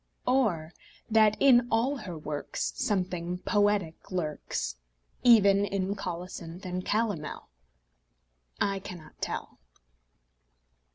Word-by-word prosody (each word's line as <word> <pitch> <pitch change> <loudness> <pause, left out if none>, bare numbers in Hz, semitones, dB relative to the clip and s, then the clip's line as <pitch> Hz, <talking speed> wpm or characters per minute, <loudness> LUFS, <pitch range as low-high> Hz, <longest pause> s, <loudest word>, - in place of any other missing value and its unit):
Or 185 -12 +1 0.4
that 215 -1 +5
in 245 -3 +6
all 245 +6 +1
her 190 -9 -7
works 150 -1 -3
Something 180 -3 -1
poetic 205 -4 0
lurks, 155 - -3 0.4
Even 200 -5 +6
in 195 -1 -1
colocynth 180 -1 -6
and 180 0 -3
calomel? 205 -8 -2 1.1
I 195 -1 +1
cannot 175 -5 -11
tell. - - -4
195 Hz, 95 wpm, -29 LUFS, 175-215 Hz, 1.1 s, in